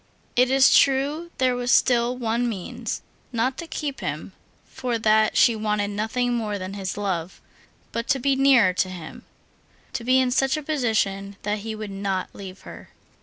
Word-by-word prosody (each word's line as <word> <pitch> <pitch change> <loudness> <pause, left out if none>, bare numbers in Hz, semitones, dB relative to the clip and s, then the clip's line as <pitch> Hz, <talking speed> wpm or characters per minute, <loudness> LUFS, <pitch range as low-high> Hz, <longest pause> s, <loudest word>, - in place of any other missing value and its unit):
It 250 +1 +4
is 265 0 +5
true 285 +5 +2
there 255 -1 +2
was 245 0 -1
still 245 0 +3
one 235 0 0
means; 195 -6 -5 0.3
not 250 +2 0
to 335 - -6
keep 290 -4 -4
him—for 245 -2 -5
that 215 -1 +3
she 235 - +5
wanted 210 -1 -1
nothing 225 +4 -1
more 215 -3 -2
than 185 0 -6
his 195 -1 -4
love—but 195 +4 -6
to 275 - +2
be 270 +1 +1
nearer 260 -8 +5
to 185 +1 0
him, 180 -3 -9 0.7
to 235 - -3
be 255 +2 +4
in 255 -1 +2
such 270 +2 +2
a 305 - -5
position 215 -9 -1
that 210 +1 -1
he 220 +1 -5
would 215 -2 -6
not 195 -1 -3
leave 190 -1 -10
her. - - -11
230 Hz, 170 wpm, -24 LUFS, 205-260 Hz, 0.7 s, is